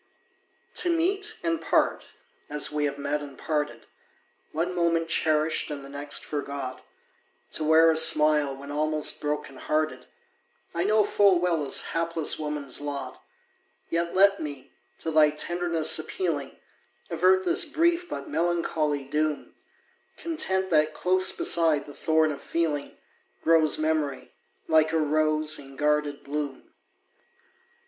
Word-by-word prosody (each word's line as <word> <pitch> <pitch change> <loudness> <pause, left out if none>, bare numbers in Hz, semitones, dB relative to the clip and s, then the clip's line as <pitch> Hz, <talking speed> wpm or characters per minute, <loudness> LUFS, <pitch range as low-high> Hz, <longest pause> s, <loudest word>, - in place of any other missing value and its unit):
To 355 - +3
meet, 390 +6 0
and 330 -1 -1
part, - - +1 0.4
as 150 0 0
we 150 0 0
have 140 -1 -3
met 145 +1 -2
and 140 -2 -10
parted, 150 -2 -3 0.7
One 170 +3 -2
moment 170 -1 0
cherished 155 -1 +1
and 140 -2 -6
the - - -11
next 145 +1 -3
forgot, 140 -3 -5 0.7
To 155 - -3
wear 160 +1 +5
a - - 0
smile 150 -3 +4
when 140 +1 -9
almost 155 +1 0
broken 150 -2 -3
hearted, 155 -5 -2 0.7
I 170 +2 -1
know 215 +1 +4
full 200 -2 +4
well 170 -3 0
is 140 - 0
hapless 165 -1 0
woman's 150 -3 -4
lot; 145 -1 -6 0.7
Yet 170 +1 -1
let 200 +1 +5
me, 145 -4 -7 0.3
to 160 - -4
thy 155 -1 +5
tenderness 165 +1 0
appealing, 155 -4 -3 0.5
Avert 185 +3 +3
this 345 +1 +3
brief 340 +3 +1
but 140 - -6
melancholy 160 -3 -1
doom 150 +1 -2 0.6
Content 190 - -2
that 155 -1 +2
close 185 +1 +3
beside 165 -4 +2
the 145 - -11
thorn 160 +1 +1
of 140 - -7
feeling, 155 -4 -2 0.5
Grows 160 -2 +4
memory, 155 -3 -2 0.4
like 160 -1 +3
a - - +3
rose, 155 0 +1
in 135 -1 -12
guarded 150 0 0
bloom. 145 -1 -5
155 Hz, 135 wpm, -26 LUFS, 145-170 Hz, 0.7 s, wear